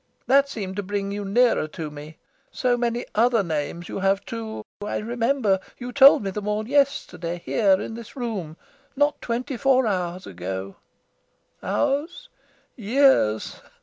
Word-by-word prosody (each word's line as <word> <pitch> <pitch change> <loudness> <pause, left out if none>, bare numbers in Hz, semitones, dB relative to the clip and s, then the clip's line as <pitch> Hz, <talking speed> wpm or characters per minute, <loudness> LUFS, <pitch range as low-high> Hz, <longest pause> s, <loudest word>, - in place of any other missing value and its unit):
That 275 +1 +4
seemed 195 -7 -5
to - - 0
bring 200 0 -3
you 205 0 -4
nearer 225 -3 +2
to 155 -1 -6
me. 150 +2 -10 0.3
So 250 -1 +1
many 240 0 -1
other 230 -1 +3
names 170 +1 -3
you - - -5
have, 195 +1 +1
too. 225 -1 -6 0.2
I 210 - -2
remember 230 -2 +1 0.2
you 250 0 -6
told 275 -2 +7
me 195 - -2
them 210 +1 -5
all 210 +1 -1
yesterday, 270 -11 0
here 195 -4 +3
in 225 - -5
this 230 -1 -10
room 205 - -4 0.4
not 290 +1 +1
twenty 250 +3 -3
four 260 0 +3
hours 185 -3 -2
ago. 95 +2 -6 0.8
Hours? 290 - -1 0.5
Years!" 230 - +2
215 Hz, 150 wpm, -24 LUFS, 185-250 Hz, 0.8 s, told